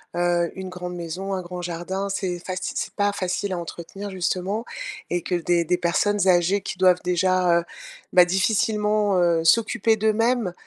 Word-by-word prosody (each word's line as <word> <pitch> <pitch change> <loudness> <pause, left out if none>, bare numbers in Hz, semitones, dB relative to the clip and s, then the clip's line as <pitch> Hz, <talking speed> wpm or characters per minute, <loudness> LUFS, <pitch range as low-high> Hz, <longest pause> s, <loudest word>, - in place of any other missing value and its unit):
heu, 175 -1 +1
une 190 0 -6
grande 180 -1 -6
maison, 175 +4 -4
un 190 - -2
grand 180 0 -7
jardin, 175 +3 -4
c'est 185 -2 -2
faci 185 +1 -4
c'est - - -3
pas 205 -1 +1
facile 190 0 -2
à - - -2
entretenir 175 +4 -7
justement, 190 +4 -2 0.4
et 175 0 -1
que 180 - -2
des 175 0 +1
des 175 +2 +1
personnes 195 +3 +1
âgées 180 +2 +4
qui - - -6
doivent 185 -1 +4
déjà, 180 -1 +3
heu, - - -11 0.5
bah 180 -1 +7
difficilement, 210 +1 +1
heu, 170 -2 +2
s'occuper 225 +3 +3
d'eux-mêmes, 220 -1 +1
185 Hz, 170 wpm, -23 LUFS, 175-200 Hz, 0.5 s, bah